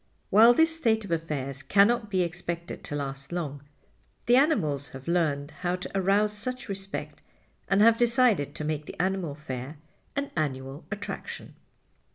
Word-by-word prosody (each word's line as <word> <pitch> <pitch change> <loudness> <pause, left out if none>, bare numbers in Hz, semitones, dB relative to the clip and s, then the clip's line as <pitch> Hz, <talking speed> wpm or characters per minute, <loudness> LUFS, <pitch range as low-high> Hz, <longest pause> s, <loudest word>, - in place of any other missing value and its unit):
While 225 +4 +8
this 320 +3 +4
state 220 -8 +1
of 190 - -8
affairs 145 -5 -3
cannot 215 +5 +3
be 185 -3 +2
expected 170 0 -5
to 145 - -4
last 140 0 -5
long, 150 -5 -3 0.6
the 240 - +5
animals 175 - +2
have 130 - -15
learned 155 -4 0
how 180 0 0
to 180 - -7
arouse 200 +2 +2
such 250 +5 -4
respect 195 -1 -5 0.5
and 195 +1 +3
have 230 0 +6
decided 235 - +3
to - - -4
make 150 -1 -3
the - - -9
Animal 185 -5 -1
Fair 135 0 -6 0.4
an 280 0 -2
annual 135 -2 -3
attraction. 205 0 -6
180 Hz, 155 wpm, -27 LUFS, 145-215 Hz, 0.6 s, While